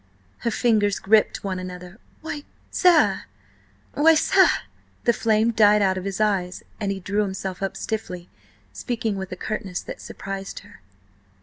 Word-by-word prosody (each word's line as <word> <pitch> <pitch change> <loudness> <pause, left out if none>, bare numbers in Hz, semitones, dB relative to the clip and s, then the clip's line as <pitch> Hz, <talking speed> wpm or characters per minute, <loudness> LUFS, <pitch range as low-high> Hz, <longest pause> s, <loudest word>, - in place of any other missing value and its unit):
Her 235 - -1
fingers 215 -3 +2
gripped 215 +2 +2
one 190 -2 -2
another. 180 +2 -8 0.2
"Why, 295 -2 -5 0.3
sir–why, 325 -2 +1
sir—" 315 - +5 0.6
The 235 - +4
flame 220 0 +2
died 210 -2 +5
out 190 -1 +2
of 185 0 -5
his 195 0 -3
eyes, 195 -4 0 0.2
and 200 -2 -1
he 195 - -3
drew 200 +3 -1
himself 190 -2 -4
up 195 - -2
stiffly, 180 -5 -4 0.5
speaking 225 -4 -2
with 190 -1 -5
a - - -3
curtness 190 -2 -4
that - - -8
surprised 195 0 -6
her. 205 - -17
205 Hz, 145 wpm, -24 LUFS, 190-220 Hz, 0.6 s, sir